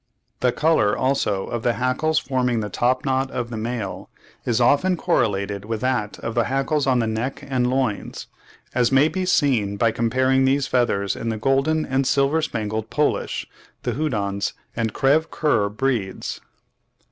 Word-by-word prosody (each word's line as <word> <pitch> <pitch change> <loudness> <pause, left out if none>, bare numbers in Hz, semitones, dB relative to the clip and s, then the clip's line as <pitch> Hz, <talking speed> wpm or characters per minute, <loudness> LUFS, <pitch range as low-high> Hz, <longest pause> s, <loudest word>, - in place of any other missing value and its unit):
The 125 - +2
colour 150 -9 +2
also 105 -7 0
of 120 - -4
the 120 +1 +1
hackles 130 +6 0
forming 125 -4 0
the 105 -1 -5
top 125 +5 +1
knot 135 0 +1
of 120 -2 -4
the - - -4
male, 110 -2 -4 0.4
is 115 -2 +2
often 145 +9 +3
correlated 100 - 0
with 110 0 -4
that 125 -5 -1
of 115 - -3
the 120 -1 +2
hackles 135 +2 0
on 130 -1 +3
the 115 - +1
neck 115 +6 -3
and 125 -2 +1
loins, 130 -5 -2 0.5
as 120 -1 +2
may 135 +3 +5
be 185 +2 -2
seen 120 - +2
by 115 +2 +3
comparing 130 +4 +2
these 135 +1 +2
feathers 120 -7 +1
in 115 - -3
the 110 - -2
golden 135 +6 +1
and 130 0 0
silver 140 +4 +2
spangled 110 -5 -3
Polish, 150 -1 0 0.4
the - - -1
Houdans, 105 -9 -1 0.2
and 115 -2 -1
Creve 145 +6 +2
coeur 115 -10 +1
breeds. 105 -3 -2
125 Hz, 165 wpm, -22 LUFS, 110-135 Hz, 0.5 s, may